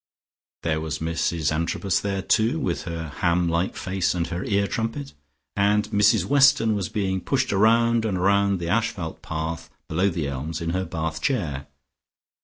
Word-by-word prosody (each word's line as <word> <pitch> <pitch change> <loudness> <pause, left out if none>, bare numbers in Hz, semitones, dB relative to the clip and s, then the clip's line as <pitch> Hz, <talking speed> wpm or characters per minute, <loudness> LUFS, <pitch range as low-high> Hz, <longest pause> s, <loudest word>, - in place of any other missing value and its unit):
There 80 -1 0
was 80 -1 -3
Mrs 80 -1 -1
Antrobus 85 +3 0
there, 100 -1 -2
too, 115 +10 +2
with 135 - -2
her 85 -2 -5
ham 85 0 +2
like 85 +2 0
face 95 -1 -1
and 85 -1 0
her 90 +1 -3
ear 100 -1 +1
trumpet, 115 +7 -3 0.4
and 105 +1 +2
Mrs 105 -2 +4
Weston 135 -4 +4
was 100 -5 -2
being 95 -2 -1
pushed 135 -2 0
round 115 +3 +3
and 100 -5 -1
round 100 +1 +3
the 85 -1 -5
asphalt 100 -4 -1
path 80 +1 -4 0.2
below 90 +5 +1
the 80 -5 -2
elms 70 +4 -4
in 85 0 -2
her 95 +1 -1
bath 80 -2 -4
chair. 80 - -1
95 Hz, 165 wpm, -24 LUFS, 80-105 Hz, 0.4 s, Mrs